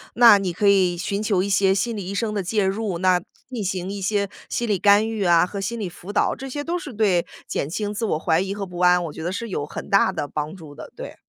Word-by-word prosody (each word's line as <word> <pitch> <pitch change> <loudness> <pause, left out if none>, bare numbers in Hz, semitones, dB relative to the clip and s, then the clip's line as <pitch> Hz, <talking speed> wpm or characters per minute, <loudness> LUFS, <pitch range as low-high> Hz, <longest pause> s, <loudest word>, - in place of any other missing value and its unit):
那 230 -3 +8
你 190 -3 -2
可 200 +4 +1
以 185 -3 +4
寻 200 +3 -2
求 200 -4 +1
一 200 - -3
些 195 0 +3
心 225 +4 -1
理 200 -3 -5
医 200 - -4
生 210 +1 -1
的 200 - -1
介 205 +2 0
入， 195 -2 -1
那 185 -1 +3 0.3
进 240 -5 -4
行 185 0 -3
一 200 - -5
些 200 0 0 0.2
心 240 - -2
理 200 -4 +1
干 205 +2 +5
预 220 -3 -2
啊 170 0 +5
和 200 +2 -6
心 230 +4 -3
理 195 - -3
辅 180 +3 -10
导。 - - +2
这 270 0 -7
些 290 +2 -4
都 345 +3 -2
是 285 -7 -8
对 200 -5 +2 0.2
减 140 - -3
轻 205 +4 -3
自 225 +2 -2
我 155 - 0 0.2
疑 195 +1 -2
和 200 - -4
不 180 -1 -9
安， 180 0 +4
我 155 - -6
觉 - - -8
得 175 - -2
是 230 +3 -4
有 145 -6 -3
很 - - -8
大 195 -1 +4
的 155 -5 -3
帮 150 +4 -4
助 155 -5 -12
的， - - -10
对。 - - -8
195 Hz, 290 characters per minute, -23 LUFS, 180-210 Hz, 0.3 s, 那